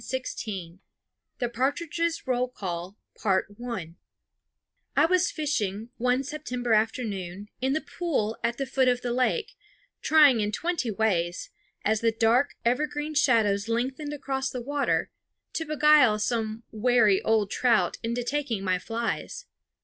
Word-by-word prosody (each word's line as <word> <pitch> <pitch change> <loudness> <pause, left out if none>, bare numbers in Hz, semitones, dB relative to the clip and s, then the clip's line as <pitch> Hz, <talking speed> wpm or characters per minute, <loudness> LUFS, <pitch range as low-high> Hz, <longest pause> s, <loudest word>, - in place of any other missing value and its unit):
The 245 - -1
Partridges' 330 +6 -1
Roll 250 -1 +1
Call 185 -4 -6 0.3
I 205 - -3
was 365 +1 +3
fishing, 225 - -2
one 250 +2 +1
September 250 -5 -2
afternoon, 205 -3 -1
in 265 +1 +1
the 310 - 0 0.2
pool 270 -11 0
at 235 - 0
the 275 - -2
foot 260 0 +1
of 250 0 +2
the 240 -1 -2
lake, 260 - 0 0.5
trying 295 -6 +6
in 210 0 0
twenty 330 -1 -1
ways, 185 -5 -1 0.3
as 215 0 +2
the 230 -1 +3
dark 230 +5 +2
evergreen 295 +4 0
shadows 225 -8 +3
lengthened 260 +6 -2
across 270 -2 -2
the 255 - -5
water, 285 +2 0 0.4
to 325 - -2
beguile 300 -7 +5
some 220 0 -2
wary 220 -3 +3
old 215 -3 +1
trout 240 -3 +2
into 235 +1 -2
taking 250 -6 -2
my 185 -1 +1
flies. 235 - -4
245 Hz, 125 wpm, -27 LUFS, 215-285 Hz, 0.5 s, trying